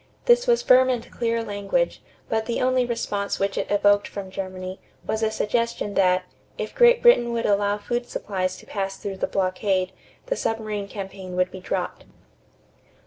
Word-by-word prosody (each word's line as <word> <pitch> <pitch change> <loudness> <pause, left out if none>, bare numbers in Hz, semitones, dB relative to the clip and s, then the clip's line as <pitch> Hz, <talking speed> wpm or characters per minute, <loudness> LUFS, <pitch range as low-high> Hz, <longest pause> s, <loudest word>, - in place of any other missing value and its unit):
This 485 0 +5
was 475 -1 +3
firm 255 0 +6
and 245 -2 -2
clear 230 -1 -1
language, 205 - -1 0.3
but 220 0 -1
the 235 - -1
only 255 -1 +2
response 205 -4 -2
which 195 0 -1
it - - -2
evoked 205 0 +3
from 195 -2 -7
Germany 185 -1 -5 0.3
was 220 - -1
a 220 - +2
suggestion 220 -1 -1
that, 185 -1 +3 0.3
if - - -4
Great 485 -1 +5
Britain 360 - +6
would 230 0 -1
allow 205 0 +2
food 240 +3 -3
supplies 185 -2 -2
to - - -14
pass 195 -1 -3
through 195 -1 -5
the - - -1
blockade, 185 0 0 0.3
the - - -1
submarine 215 - -2
campaign 195 -2 -7
would 180 0 +1
be 190 - -8
dropped. 185 - -3
205 Hz, 170 wpm, -24 LUFS, 195-235 Hz, 0.3 s, firm